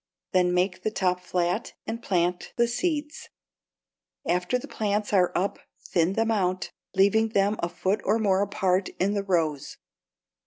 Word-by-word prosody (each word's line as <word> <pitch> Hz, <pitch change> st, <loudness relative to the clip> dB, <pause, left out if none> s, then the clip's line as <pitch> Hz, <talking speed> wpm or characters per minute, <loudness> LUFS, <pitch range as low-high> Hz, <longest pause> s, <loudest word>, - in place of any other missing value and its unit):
Then 180 Hz, -1 st, +3 dB
make 185 Hz, +1 st, +1 dB
the -, -, 0 dB
top 180 Hz, -4 st, 0 dB
flat 180 Hz, +3 st, -1 dB
and 230 Hz, +1 st, -4 dB
plant 180 Hz, -4 st, 0 dB
the 235 Hz, 0 st, +3 dB
seeds. 295 Hz, +4 st, -2 dB, 1.0 s
After 180 Hz, +8 st, +1 dB
the 250 Hz, -, -8 dB
plants 210 Hz, -1 st, -1 dB
are 180 Hz, -3 st, +4 dB
up 195 Hz, +3 st, 0 dB, 0.3 s
thin 170 Hz, +1 st, +2 dB
them 225 Hz, +2 st, +1 dB
out, 185 Hz, -3 st, 0 dB, 0.2 s
leaving 200 Hz, +4 st, +4 dB
them 200 Hz, -1 st, +2 dB
a 170 Hz, -, -1 dB
foot 195 Hz, +4 st, -1 dB
or 210 Hz, +3 st, +2 dB
more 200 Hz, -3 st, +2 dB
apart 190 Hz, -2 st, +1 dB
in 195 Hz, +3 st, +2 dB
the 200 Hz, -, 0 dB
rows. 165 Hz, -7 st, -1 dB
195 Hz, 155 wpm, -26 LUFS, 180-215 Hz, 1.0 s, are